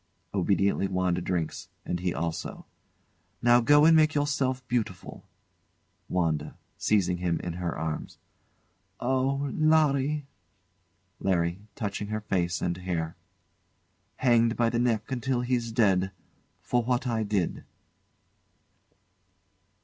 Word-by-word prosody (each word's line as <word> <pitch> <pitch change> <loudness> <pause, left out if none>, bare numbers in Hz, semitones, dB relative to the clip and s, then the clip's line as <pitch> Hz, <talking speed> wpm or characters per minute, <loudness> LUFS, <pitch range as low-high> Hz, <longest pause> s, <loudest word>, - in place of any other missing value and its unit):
[Obediently 100 0 +2
WANDA 90 -1 0
drinks, 85 -3 -3 0.2
and 90 - -2
he 90 0 -1
also.] 85 -1 -4 0.7
Now 120 0 +5
go 145 +5 +6
and 165 0 +7
make 155 0 +4
yourself 135 -3 0
beautiful. 110 -7 -3 0.8
WANDA. 80 -4 -1 0.2
[Seizing 90 -4 +1
him 85 -2 -1
in 85 - -4
her 85 -1 -3
arms] 80 0 -4 0.8
Oh, 135 +2 0
Larry! 150 -2 +2 0.9
LARRY. 85 -1 0 0.2
[Touching 105 -1 -3
her 110 +1 -3
face 85 -5 -1
and 85 0 -1
hair] 85 -3 -3 1.0
Hanged 115 -2 +3
by 115 -1 +2
the 120 - 0
neck 115 0 0
until 125 0 0
he's 120 -2 -1
dead 100 -5 +3 0.5
for 125 - +1
what 125 +2 0
I 115 -3 0
did. 100 -4 -1
110 Hz, 110 wpm, -28 LUFS, 90-130 Hz, 1.0 s, and